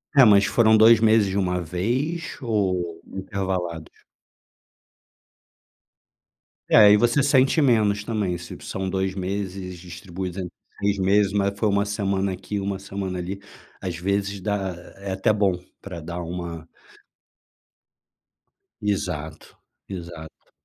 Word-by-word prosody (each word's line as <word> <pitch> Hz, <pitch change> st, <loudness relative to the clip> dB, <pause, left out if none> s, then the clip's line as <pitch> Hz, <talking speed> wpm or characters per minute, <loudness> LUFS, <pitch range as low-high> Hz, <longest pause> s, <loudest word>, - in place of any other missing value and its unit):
É, 135 Hz, -, +8 dB
mas 100 Hz, -3 st, +6 dB
foram 110 Hz, -2 st, +4 dB
2 110 Hz, +1 st, +7 dB
meses 110 Hz, -2 st, +4 dB
de 95 Hz, -, -3 dB
uma 90 Hz, -1 st, 0 dB
vez 120 Hz, -, -2 dB
ou 90 Hz, -8 st, -1 dB
intervalados? 95 Hz, -4 st, -4 dB, 2.7 s
É, 105 Hz, -2 st, +8 dB
e 105 Hz, -, +8 dB
você 120 Hz, +6 st, +3 dB
sente 140 Hz, +2 st, +4 dB
menos 105 Hz, -6 st, +3 dB
também, 100 Hz, -6 st, -1 dB
se 85 Hz, 0 st, -9 dB
são 95 Hz, 0 st, -4 dB
2 95 Hz, 0 st, -1 dB
meses 95 Hz, -1 st, -4 dB
distribuídos 90 Hz, +1 st, -7 dB
entre 90 Hz, -2 st, -5 dB, 0.3 s
6 100 Hz, 0 st, +1 dB
meses, 100 Hz, +1 st, +2 dB
mas 100 Hz, 0 st, 0 dB
foi 110 Hz, -, +2 dB
uma 100 Hz, 0 st, +2 dB
semana 100 Hz, -2 st, -1 dB
aqui, 95 Hz, +3 st, -5 dB
uma 100 Hz, -1 st, -2 dB
semana 95 Hz, -1 st, -4 dB
ali, 95 Hz, +3 st, -5 dB, 0.4 s
às 90 Hz, -3 st, -4 dB
vezes 100 Hz, +2 st, -1 dB
dá 95 Hz, -1 st, -2 dB, 0.2 s
é 100 Hz, 0 st, -6 dB
até 95 Hz, +3 st, +2 dB
bom, 100 Hz, -2 st, +2 dB, 0.3 s
para 90 Hz, -4 st, -7 dB
dar 85 Hz, +2 st, -6 dB
uma 85 Hz, -1 st, -6 dB, 2.2 s
Exato, 90 Hz, -7 st, -3 dB, 0.3 s
exato. 85 Hz, -4 st, -9 dB
95 Hz, 125 wpm, -24 LUFS, 90-105 Hz, 2.7 s, É